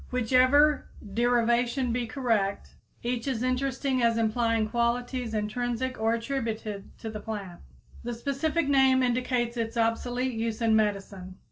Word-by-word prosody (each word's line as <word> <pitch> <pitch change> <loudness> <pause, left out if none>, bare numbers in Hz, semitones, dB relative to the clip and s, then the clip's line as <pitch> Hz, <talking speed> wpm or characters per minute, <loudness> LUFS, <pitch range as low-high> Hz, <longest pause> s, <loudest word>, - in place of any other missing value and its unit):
Whichever 255 +5 +4 0.3
derivation 240 +2 +2
be 240 -1 -1
correct, 225 -7 -1 0.3
each 240 +1 -2
is 250 -3 -1
interesting 260 +1 0
as 230 -1 +3
implying 230 0 +1
qualities, 240 +1 -1
intrinsic 245 +3 -2
or 225 +1 +2
attributed, 225 -5 -4
to 220 - -6
the 215 - -6
plant. 205 -5 -6 0.4
The 240 0 -4
specific 280 +6 -1
name 265 -2 +4
indicates 245 -1 0
its 230 0 -3
obsolete 245 +3 0
use 225 -1 -2
in 225 -2 +3
medicine. 195 -3 -1
235 Hz, 130 wpm, -27 LUFS, 225-255 Hz, 0.4 s, Whichever